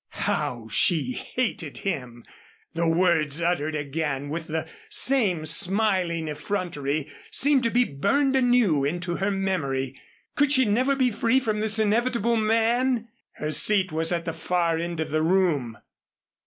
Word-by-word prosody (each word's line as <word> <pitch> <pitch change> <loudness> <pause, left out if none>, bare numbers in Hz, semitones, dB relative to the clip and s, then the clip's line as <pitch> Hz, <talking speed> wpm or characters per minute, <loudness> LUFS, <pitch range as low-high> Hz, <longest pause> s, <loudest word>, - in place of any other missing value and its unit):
How 125 -7 -2
she 165 - +2
hated 220 - -3
him! 125 - -5 0.5
The 170 0 0
words 165 -3 +2
uttered 165 -3 -1
again 145 -1 -3
with 160 +2 -5
the 160 0 -3 0.2
same 205 -12 +2
smiling 185 -1 +1
effrontery 150 -3 -3 0.2
seemed 285 -1 +4
to - - +3
be 245 +2 +3
burned 270 - 0
anew 245 - +3
into 175 +4 -2
her 195 +1 0
memory. 140 -10 -2 0.3
Could 290 -1 +2
she 260 -2 +4
never 255 +6 +2
be 260 -2 +2
free 230 +4 +2
from 215 -4 -2
this 220 +1 0
inevitable 235 +1 +1
man? 230 +2 +1 0.2
Her 150 0 -4
seat 195 +2 +2
was 160 +2 -1
at 170 -1 -2
the 165 - -3
far 165 0 0
end 170 -1 -4
of 160 - -3
the 155 +1 +1
room. 160 - +1
175 Hz, 145 wpm, -25 LUFS, 155-225 Hz, 0.5 s, seemed